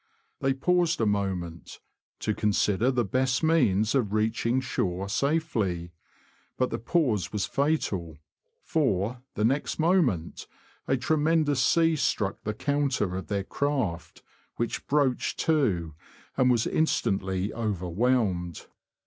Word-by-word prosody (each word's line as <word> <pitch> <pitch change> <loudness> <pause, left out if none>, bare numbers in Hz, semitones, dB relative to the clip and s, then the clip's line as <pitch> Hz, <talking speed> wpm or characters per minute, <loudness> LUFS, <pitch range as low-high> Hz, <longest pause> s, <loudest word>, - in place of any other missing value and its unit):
They 135 0 +1
paused 175 +3 +1
a 115 - +2
moment, 95 -5 -3 0.4
to 110 - 0
consider 105 +2 +1
the 125 -3 +1
best 130 - 0
means 110 - +3
of 115 -7 0
reaching 110 +3 +1
shore 95 -7 -2
safely; 105 - -1 0.7
but 130 - 0
the - - -2
pause 120 - 0
was 105 -2 -1
fatal, 100 - -1 0.5
for, 120 - 0
the 105 - +1
next 135 +5 0
moment, 155 - +1 0.4
a 135 - +2
tremendous 150 0 +2
sea 165 +2 +3
struck 105 -8 -1
the 105 0 -3
counter 140 -9 0
of 95 - -5
their 100 -1 -1
craft, 105 - -2 0.3
which 120 - -3
broached 140 -4 +1
to, 100 - +1 0.4
and 130 -1 +3
was 120 -2 +2
instantly 95 -10 0
overwhelmed. 100 -3 -1
115 Hz, 120 wpm, -27 LUFS, 95-140 Hz, 0.7 s, means